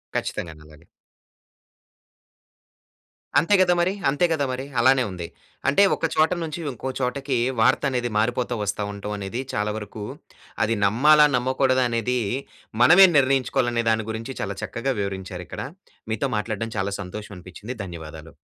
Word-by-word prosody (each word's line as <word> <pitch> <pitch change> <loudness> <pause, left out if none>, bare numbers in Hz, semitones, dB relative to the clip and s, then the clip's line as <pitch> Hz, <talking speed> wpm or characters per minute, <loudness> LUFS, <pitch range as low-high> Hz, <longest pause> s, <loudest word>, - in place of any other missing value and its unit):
ఖచ్చితంగా. 80 - -3
నందాలు 75 0 -17 2.6
అంతే 170 +8 +3
కదా! 180 -1 +4
మరి. 180 +2 +1 0.2
అంతే 145 +5 +2
గదా! 145 -3 +1
మరి 130 +1 -4
అలానే 130 +2 +5
ఉంది. 85 -2 -6 0.4
అంటే 145 +9 +5
ఒక - - -2
చోట 155 +2 +3
నుంచి 160 +1 -5
ఇంకో 130 +2 -5
చోటకి 135 +1 -1 0.2
వార్త 130 +5 +3
అనేది 125 -2 -1
మారిపోతా 120 +3 0
వస్తా 105 +1 -2
ఉంటవనేది 100 +3 -5
చాలా 105 0 0
వరకు 105 0 -7 0.6
అది 115 - +1
నమ్మాలా, 150 +9 +6
నమ్మకూడదా 130 0 +2
అనేది 120 +2 0 0.6
మనమే 175 +9 +9
నిర్ణయించుకోవాలనే 130 -3 +2
దాని 110 -1 +1
గురించి 115 +4 -5
చాలా 100 0 -3
చక్కగా 135 +3 -2
వివరించారిక్కడ. 95 -2 -5 0.5
మీతో 115 +5 -1
మాట్లాడడం 110 +1 -3
చాలా 100 +1 -1
సంతోషం 105 +2 -8
అనిపిచ్చింది. 95 +7 -9
ధన్యవాదాలు. 80 -3 -9
120 Hz, 130 wpm, -24 LUFS, 100-135 Hz, 2.6 s, మనమే